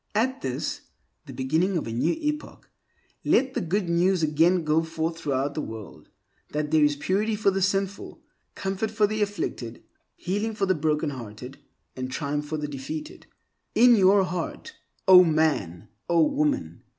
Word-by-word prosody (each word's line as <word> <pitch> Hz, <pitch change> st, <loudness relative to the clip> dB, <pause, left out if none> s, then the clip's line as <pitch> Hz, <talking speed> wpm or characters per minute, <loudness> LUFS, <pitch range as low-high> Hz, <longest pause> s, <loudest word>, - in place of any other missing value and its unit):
At 255 Hz, +5 st, 0 dB
this, 130 Hz, -2 st, -3 dB, 0.5 s
the -, -, -8 dB
beginning 160 Hz, +8 st, 0 dB
of 160 Hz, -, -3 dB
a 115 Hz, -, -5 dB
new 120 Hz, -, +1 dB
epoch, 300 Hz, -1 st, -4 dB, 0.6 s
let 260 Hz, 0 st, +2 dB
the -, -, -1 dB
Good 180 Hz, +3 st, -1 dB
News 175 Hz, +1 st, +2 dB
again 165 Hz, +4 st, +3 dB
go 155 Hz, +1 st, +2 dB
forth 165 Hz, 0 st, -3 dB
throughout 140 Hz, -2 st, -1 dB
the 155 Hz, -, -3 dB
world 110 Hz, -, -9 dB, 0.4 s
that 150 Hz, 0 st, -2 dB
there 155 Hz, -1 st, +4 dB
is 145 Hz, 0 st, +3 dB
purity 200 Hz, +9 st, 0 dB
for 205 Hz, -1 st, +2 dB
the 195 Hz, 0 st, -1 dB
sinful, 195 Hz, +1 st, -1 dB, 0.4 s
comfort 195 Hz, +3 st, -2 dB
for 215 Hz, -1 st, +2 dB
the 215 Hz, +1 st, -2 dB
afflicted, 195 Hz, -, -3 dB, 0.3 s
healing 205 Hz, +4 st, -2 dB
for 200 Hz, -, 0 dB
the 190 Hz, -, +2 dB
broken 150 Hz, -1 st, 0 dB
hearted, 125 Hz, +1 st, -9 dB, 0.4 s
and 130 Hz, 0 st, -4 dB
triumph 145 Hz, +1 st, -3 dB
for 155 Hz, +1 st, -3 dB
the 150 Hz, 0 st, -3 dB
defeated. 145 Hz, +2 st, -7 dB, 0.5 s
In 245 Hz, 0 st, +7 dB
your 195 Hz, -1 st, +5 dB
heart, 180 Hz, -, -5 dB, 0.3 s
O 185 Hz, -1 st, +10 dB
man! 150 Hz, -, 0 dB, 0.2 s
O 170 Hz, -1 st, +4 dB
woman! 295 Hz, 0 st, -1 dB
165 Hz, 165 wpm, -25 LUFS, 145-200 Hz, 0.6 s, O